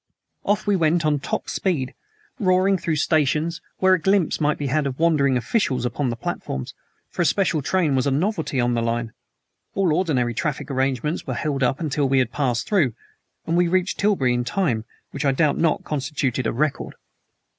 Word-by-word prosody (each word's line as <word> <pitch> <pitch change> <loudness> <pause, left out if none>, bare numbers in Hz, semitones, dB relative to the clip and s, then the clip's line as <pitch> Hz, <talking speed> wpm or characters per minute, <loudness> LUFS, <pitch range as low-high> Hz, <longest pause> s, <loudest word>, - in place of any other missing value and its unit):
Off 210 +1 +1
we 205 -1 +2
went 165 -1 +2
on 150 -1 +2
top - - -3
speed, 150 -10 -1 0.5
roaring 190 -1 +3
through 165 -3 -1
stations, 155 +2 +1 0.2
where 190 0 +4
a 185 - +3
glimpse 190 -3 +2
might 150 0 +2
be 145 - -4
had 140 +1 +1
of 130 -1 -5
wondering 150 -5 +3
officials 125 - 0
upon 125 +2 -1
the 115 - -2
platforms, 65 - -5 0.4
for - - -2
a - - +3
special 170 -4 +1
train 160 -1 +1
was 130 +1 +1
a - - +3
novelty 160 -1 -1
on 120 0 +2
the 120 - 0
line. 115 -1 -2 0.6
All 190 -5 +2
ordinary 145 -9 +1
traffic 145 +3 -3
arrangements 135 +4 -1
were - - -2
held 145 -3 -2
up 130 +1 +1
until 145 -3 0
we 135 - +3
had 125 -3 +2
passed 125 -4 -1
through, 155 - +2 0.5
and 165 - 0
we 175 0 +3
reached 185 +2 0
Tilbury 190 -12 +2
in 120 0 0
time 125 - -1 0.3
which 140 - -4
I 135 -2 +3
doubt 145 +1 +2
not 165 -2 +1
constituted 135 -4 -2
a - - 0
record. 150 +4 -2
150 Hz, 190 wpm, -23 LUFS, 130-170 Hz, 0.6 s, where